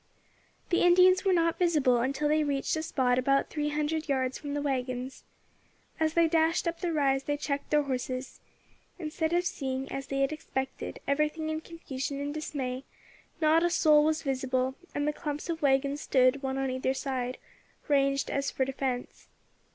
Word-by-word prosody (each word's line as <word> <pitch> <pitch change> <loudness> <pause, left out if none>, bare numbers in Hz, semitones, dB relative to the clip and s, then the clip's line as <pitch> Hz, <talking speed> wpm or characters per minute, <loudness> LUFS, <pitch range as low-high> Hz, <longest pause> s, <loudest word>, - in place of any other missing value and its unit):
The 345 - +3
Indians 365 +1 +6
were 390 - +3
not 335 -2 +2
visible 300 -8 +3
until 270 +4 0
they 305 +1 +3
reached 280 0 0
a 315 - -1
spot 260 -6 +1
about 275 +2 +1
three 295 -1 -1
hundred 300 +1 -2
yards 260 -2 0
from 290 -1 -5
the 290 - -1
waggons. 255 -2 -3 0.7
As 315 0 +1
they 335 -1 +5
dashed 325 +1 +2
up 335 0 -2
the 350 -2 -1
rise 275 -3 +1
they 290 0 -1
checked 285 -1 -3
their 300 -1 +3
horses. 255 -1 -4 0.6
Instead 320 -1 -2
of 350 +1 +1
seeing, 270 -6 -3
as 270 0 -4
they 275 0 -1
had 275 - +2
expected, 265 -3 -5
everything 305 +2 0
in 315 0 -3
confusion 280 -4 -5
and 285 +1 -3
dismay, 270 -4 -4 0.6
not 315 +1 +5
a 345 - +3
soul 305 -3 +5
was 315 +1 +1
visible, 260 -2 0 0.2
and 290 0 0
the 300 - +1
clumps 300 +1 -5
of 330 -1 -2
waggons 280 +1 +2
stood, 255 +1 +3
one 265 -1 -2
on 270 -1 -1
either 260 +1 -1
side, 255 -2 -3 0.5
ranged 275 -1 +2
as 280 0 0
for 265 - 0
defence. 260 -2 -4
285 Hz, 175 wpm, -29 LUFS, 265-315 Hz, 0.7 s, Indians